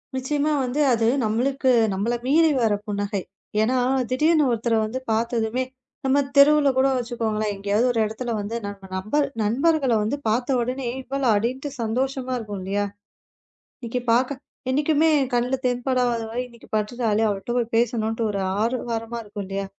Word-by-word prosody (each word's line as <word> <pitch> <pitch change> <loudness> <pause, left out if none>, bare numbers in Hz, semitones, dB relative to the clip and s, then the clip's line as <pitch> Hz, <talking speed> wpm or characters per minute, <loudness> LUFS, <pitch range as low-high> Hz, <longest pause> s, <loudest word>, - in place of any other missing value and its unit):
நிச்சயமாக 290 +2 0
வந்து, 255 +4 -2
அது 225 -1 +2 0.2
நம்மளுக்கு 260 +4 +1 0.2
நம்மளை 220 +5 0
மீறி 320 +3 +5
வரும் 210 -2 +1
புன்னகை. 205 0 -2 0.4
ஏன் 225 +3 +2
என்றால் 255 0 +1
திடீர் 300 +6 +3
என்று 305 -3 +4
ஒருத்தரை 230 0 +1
வந்து 250 +4 -4
பார்த்ததுமே 230 +2 0 0.4
நம்ம 265 +2 +3 0.2
தெருவில் 290 +1 +6
கூட 265 +1 +4
வைத்துக்கொள்ளுங்களேன், 225 -4 -1
எங்கேயாவது 205 +4 +1
ஒரு 230 - -1
இடத்தில் 230 +2 -4
வந்து 205 +3 -4
நம்ம 195 -1 -9
நம்பர் 215 +10 0 0.2
நண்பர்களை 270 +2 +2
வந்து 260 +7 -1
பார்த்தவுடனே 250 +3 0
ஏய் 265 - -6
இவளா 270 -1 -1
அப்படின்னுட்டு 255 +7 -2
சந்தோஷமாக 255 +2 -1
இருக்கும் 205 -3 -6
இல்லையா? 200 +2 -1 1.0
இன்றைக்கு 240 +1 -3
பாக்க 260 +3 +1 0.3
எப்போதுமே 300 +3 +3 0.2
கண்ணில் 250 +2 0
தென்படாதவள் 245 -1 0
இன்றைக்கு 235 -1 -17
பட்டுட்டாளே 220 0 0
அவ 205 - +1
கிட்ட 240 - -5
போய்ப் 235 -1 -2
பேசவேண்டும் 230 -1 +1
என்று 225 0 -2
ஒரு 200 -1 -2 0.2
ஆரவாரமாக 235 -1 -3
இருக்கும் 205 -1 -6
இல்லையா? 195 0 -3
240 Hz, 150 wpm, -23 LUFS, 220-265 Hz, 1.0 s, தெருவில்